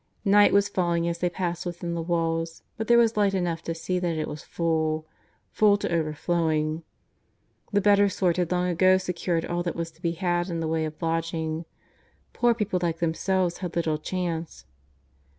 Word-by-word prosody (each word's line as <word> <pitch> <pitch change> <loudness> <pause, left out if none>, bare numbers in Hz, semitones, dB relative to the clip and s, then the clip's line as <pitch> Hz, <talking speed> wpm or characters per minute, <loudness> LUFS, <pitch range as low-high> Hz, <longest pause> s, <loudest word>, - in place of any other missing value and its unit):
Night 205 +1 +6
was 200 0 +4
falling 170 -4 0
as 170 0 -2
they 180 - +1
passed 175 -1 -3
within 175 -1 -4
the 170 - -2
walls, 165 -1 -1
but 220 -1 -4
there 235 - +6
was 230 -2 +3
light 200 -2 +3
enough 175 -3 -1
to 165 - -4
see 180 +2 -2
that 170 -3 -1
it 155 - -2
was 150 - -6
full, 160 -2 -1 0.5
full 205 -1 +4
to 200 - -3
overflowing. 155 0 0 0.9
The 205 -1 +2
better 205 0 +5
sort 180 -2 0
had 180 -1 0
long 180 0 +1
ago 185 +2 +4
secured 180 -2 -2
all 175 0 -2
that 175 -2 -3
was 165 0 -4
to 160 +1 -26
be 170 -2 0
had 175 +1 -1
in 170 -1 -2
the 165 - -2
way 160 0 0
of 155 0 -7
lodging. 165 0 -2 0.7
Poor 240 -1 +3
people 210 -5 -1
like 170 -2 0
themselves 175 +2 0
had 180 -3 -5
little 160 -3 0
chance. 170 -1 -4
170 Hz, 185 wpm, -26 LUFS, 165-185 Hz, 0.9 s, Night